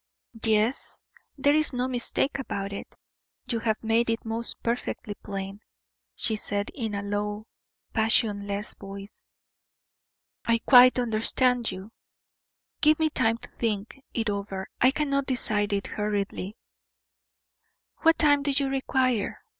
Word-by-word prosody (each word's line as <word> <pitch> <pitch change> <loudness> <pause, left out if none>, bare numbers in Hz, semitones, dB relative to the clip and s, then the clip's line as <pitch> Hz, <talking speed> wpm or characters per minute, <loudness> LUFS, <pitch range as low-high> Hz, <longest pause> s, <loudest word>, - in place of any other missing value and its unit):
"Yes, 220 +3 +1 0.4
there 285 +1 +3
is 310 -2 +4
no 250 +1 0
mistake 260 +2 -1
about 200 -6 -4
it 200 - -8 0.5
you 240 -2 -1
have 220 -1 -1
made 225 +1 +2
it 230 0 -1
most 225 +1 -3
perfectly 235 -2 -2
plain," 195 -1 -6 0.6
she 220 - +1
said, 205 -1 -2
in 225 -6 -4
a 200 - -3
low, 205 +1 -3 0.5
passionless 210 -2 +1
voice. 195 +1 -10 1.2
"I 230 0 +3
quite 250 +1 +7
understand 245 +1 +2
you. 190 +3 -9 0.9
Give 305 0 +5
me 315 -1 +1
time 225 -4 +2
to - - -12
think 225 +3 -2
it 230 -1 -2
over 200 -2 -3 0.2
I 255 - +7
cannot 275 -1 0
decide 215 -5 0
it 200 -1 -1
hurriedly." 205 -1 -3 1.4
"What 325 0 +4
time 290 -2 +4
do 285 - -1
you 275 0 +1
require?" 260 -4 0
225 Hz, 130 wpm, -27 LUFS, 205-255 Hz, 1.4 s, quite